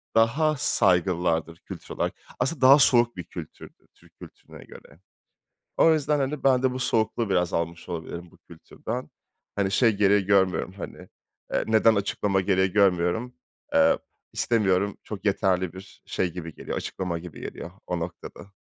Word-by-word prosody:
daha 145 Hz, +8 st, +3 dB
saygılılardır 90 Hz, -6 st, +1 dB
kültür -, -, -10 dB
olarak. -, -, -1 dB, 0.3 s
Aslında 130 Hz, +2 st, -1 dB
daha 135 Hz, +3 st, +8 dB
soğuk 120 Hz, -3 st, +4 dB
bir 90 Hz, -, -5 dB
kültürdür -, -, -11 dB
Türk -, -, -24 dB
kültürüne -, -, -13 dB
göre. 70 Hz, +5 st, -15 dB, 0.8 s
O 165 Hz, -, +6 dB
yüzden, 150 Hz, -1 st, 0 dB
hani, 135 Hz, +2 st, -2 dB
ben 130 Hz, -2 st, +3 dB
de 130 Hz, -, +3 dB
bu 130 Hz, -, -5 dB
soğukluğu 115 Hz, -3 st, 0 dB
biraz 90 Hz, -2 st, +1 dB
almış 85 Hz, +1 st, -3 dB
olabilirim 85 Hz, 0 st, -6 dB
bu -, -, -21 dB
kültürden. -, -, -8 dB, 0.5 s
Hani, 100 Hz, -1 st, 0 dB
şey 115 Hz, +1 st, +4 dB
gereği 100 Hz, -1 st, +3 dB
görmüyorum, 95 Hz, -2 st, +2 dB
hani, 100 Hz, -, -8 dB, 0.6 s
eee, -, -, +1 dB
neden 110 Hz, 0 st, +4 dB
açıklama 100 Hz, -1 st, 0 dB
gereği 95 Hz, -1 st, +1 dB
görmüyorum. 100 Hz, +5 st, +1 dB, 0.4 s
Eee, 280 Hz, -1 st, +4 dB, 0.4 s
istemiyorum, 100 Hz, -3 st, +1 dB
çok 105 Hz, -2 st, -8 dB
yeterli 95 Hz, -3 st, +1 dB
bir 95 Hz, +1 st, -13 dB
şey 90 Hz, -2 st, -2 dB
gibi 85 Hz, -3 st, -7 dB
geliyor, -, -, -6 dB
açıklama 85 Hz, -3 st, -4 dB
gibi 85 Hz, -2 st, -10 dB
geliyor 85 Hz, -, -7 dB, 0.2 s
o 90 Hz, -1 st, -2 dB
noktada. 90 Hz, +3 st, -8 dB
100 Hz, 150 wpm, -25 LUFS, 90-120 Hz, 0.8 s, daha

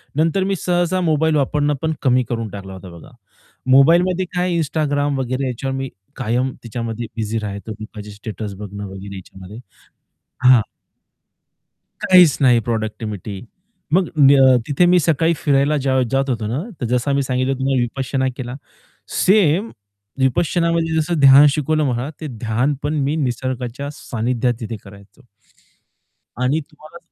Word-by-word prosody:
नंतर 165 Hz, +5 st, +1 dB
मी 195 Hz, 0 st, 0 dB
सहसा 175 Hz, +1 st, 0 dB
मोबाईल 160 Hz, -2 st, +2 dB
वापरणं 145 Hz, +1 st, +1 dB
पण 160 Hz, 0 st, 0 dB
कमी 125 Hz, -2 st, +3 dB
करून 115 Hz, -2 st, -2 dB
टाकला 95 Hz, -1 st, -9 dB
होता 95 Hz, -1 st, -10 dB
बघा. 80 Hz, -, -14 dB, 0.6 s
मोबाईलमध्ये 175 Hz, +7 st, +4 dB
काय 180 Hz, -1 st, 0 dB
Instagram 145 Hz, -2 st, 0 dB
वगैरे 130 Hz, +1 st, -2 dB
याच्यावर 135 Hz, +2 st, -3 dB
मी 135 Hz, -1 st, -4 dB, 0.3 s
कायम 125 Hz, +2 st, -1 dB
त्याच्यामध्ये 115 Hz, 0 st, -5 dB
बिझी 110 Hz, 0 st, -2 dB
राहायचो 105 Hz, +1 st, -6 dB
लोकांचे 105 Hz, -1 st, -9 dB
स्टेटस 105 Hz, 0 st, -7 dB
बघणं 100 Hz, 0 st, -7 dB
वगैरे 95 Hz, +1 st, -9 dB
याच्यामध्ये, 95 Hz, +2 st, -11 dB, 0.9 s
हां. 125 Hz, -3 st, +7 dB, 1.4 s
काहीच 180 Hz, -5 st, +6 dB
नाही 125 Hz, -3 st, +5 dB
प्रॉडक्टिव्हिटी 110 Hz, -3 st, -4 dB, 0.5 s
मग 185 Hz, -1 st, +3 dB
न 135 Hz, -2 st, +6 dB
तिथे 145 Hz, +5 st, +3 dB
मी 180 Hz, 0 st, +5 dB
सकाळी 165 Hz, +1 st, +2 dB
फिरायला 145 Hz, -1 st, +2 dB
जेव्हा 130 Hz, -1 st, +1 dB
जात 135 Hz, +1 st, +1 dB
होतो, 115 Hz, -4 st, -2 dB
ना 125 Hz, +8 st, -2 dB, 0.2 s
तर -, -, -1 dB
जसं 125 Hz, +3 st, 0 dB
मी 140 Hz, -, +2 dB
सांगितलं 130 Hz, 0 st, 0 dB
तुम्हाला 135 Hz, -1 st, +1 dB
विपश्यना 130 Hz, +2 st, -2 dB
केला. 125 Hz, 0 st, -5 dB, 0.7 s
सेम 195 Hz, +1 st, +3 dB, 0.5 s
विपश्यनामध्ये 165 Hz, +4 st, +1 dB
जसं 160 Hz, +1 st, 0 dB
ध्यान 140 Hz, +1 st, +8 dB
शिकवलं 155 Hz, +2 st, 0 dB
मला, 125 Hz, +4 st, -3 dB
ते 155 Hz, -, -4 dB
ध्यान 120 Hz, +3 st, -1 dB
पण 150 Hz, +1 st, -1 dB
मी 145 Hz, +3 st, 0 dB
निसर्गाच्या 130 Hz, -1 st, -3 dB
सानिध्यात 120 Hz, 0 st, -1 dB
तिथे 115 Hz, -1 st, -5 dB
करायचो. 100 Hz, +6 st, -16 dB, 1.2 s
आणि 140 Hz, +5 st, +1 dB
तुम्हाला 155 Hz, +2 st, -14 dB
135 Hz, 140 wpm, -19 LUFS, 115-155 Hz, 1.4 s, ध्यान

